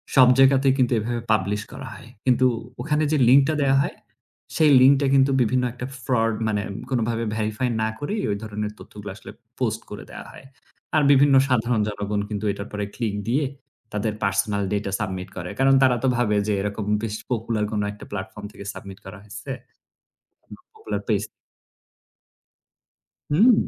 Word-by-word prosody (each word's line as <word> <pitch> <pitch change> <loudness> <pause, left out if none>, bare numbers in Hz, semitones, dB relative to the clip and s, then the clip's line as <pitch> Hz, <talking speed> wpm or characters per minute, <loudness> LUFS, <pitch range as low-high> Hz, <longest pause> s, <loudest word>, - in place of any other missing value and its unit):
সব 130 -2 +8
জায়গাতেই 135 0 +5
কিন্তু 125 -2 +2
এভাবে 120 +2 -3
publish 105 +1 0
করা - - -8
হয়। - - -13 0.2
কিন্তু 130 0 +4 0.4
ওখানে 150 +2 0
যে 155 - +3
link 135 +3 +8
টা 155 - +1
দেয়া 135 -1 +3
হয় - - -3 0.6
সেই 155 -2 +5
link 135 +2 +7
টা 140 - +2
কিন্তু 135 0 +4
বিভিন্ন 125 +2 +2
একটা 125 0 -6 0.2
fraud 115 -3 +1
মানে 105 -2 0 0.3
কোনভাবে 115 -2 0
verify 110 +3 -1
না 110 - +1
করেই 205 +8 -2
ওই 100 - -1
ধরনের 105 -1 -4
তথ্যগুলো - - -9
আসলে - - -11 0.3
post - - -1
করে - - -7
দেয়া - - -9
হয়। - - -14 0.5
আর 155 - +5
বিভিন্ন 140 0 +5
সাধারণ 120 -3 +1
জনগণ 105 0 -2
কিন্তু 105 0 -3
এটার 100 +1 -6
উপর 105 - -6 0.2
click 110 -4 -2
দিয়ে 140 +4 +2 0.5
তাদের 105 +1 -1
personal 100 +1 0
data 100 -1 -2
submit 95 -3 -4
করে। 90 -1 -5
কারণ 135 0 +5
তারা 125 -2 +5
তো - - +3
ভাবে 110 -4 +1
যে 105 - +1
এরকম 105 +1 -3 0.2
বেশ 110 -2 -2 0.2
popular 115 -2 -1
কোন 105 -1 -1
একটা 105 - -12
platform 95 +1 -6
থেকে 100 - -11
submit 95 -1 -10
করা 95 +1 -9
হয়েছে। 105 +4 -10 1.0
কোনো - - -11
Popular 435 0 -5
page. - - +1 2.1
হুম। 220 +11 +6
115 Hz, 170 wpm, -23 LUFS, 105-135 Hz, 2.1 s, সব